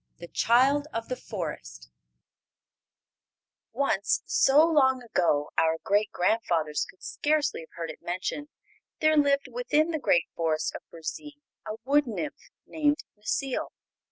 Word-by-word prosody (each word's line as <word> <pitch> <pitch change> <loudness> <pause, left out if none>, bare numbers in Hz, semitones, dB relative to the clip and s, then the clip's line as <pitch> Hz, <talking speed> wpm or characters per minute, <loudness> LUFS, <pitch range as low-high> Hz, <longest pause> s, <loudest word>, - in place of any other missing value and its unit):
The 170 - -9
Child 270 +5 +3
of 230 0 -5
the 255 - -1
Forest 60 - -7 1.8
Once, 220 -6 0
so 290 +4 +5
long 265 -6 +3
ago 165 -10 +1
our 160 0 +2
great 205 +1 +1
grandfathers 170 -6 0
could 185 - -17
scarcely 300 0 0
have 160 - -11
heard 165 -1 -4
it - - -14
mentioned, 185 +11 -3 0.5
there 310 0 +4
lived 280 -1 +3
within 335 -10 +1
the 315 - -2
great 175 - +3
Forest 160 -2 0
of - - -7
Burzee 170 - -7 0.3
a 215 - -3
wood 285 +1 +3
nymph 290 +6 -5 0.2
named 295 -1 0
Necile. 250 +5 -2
230 Hz, 130 wpm, -27 LUFS, -, 1.8 s, so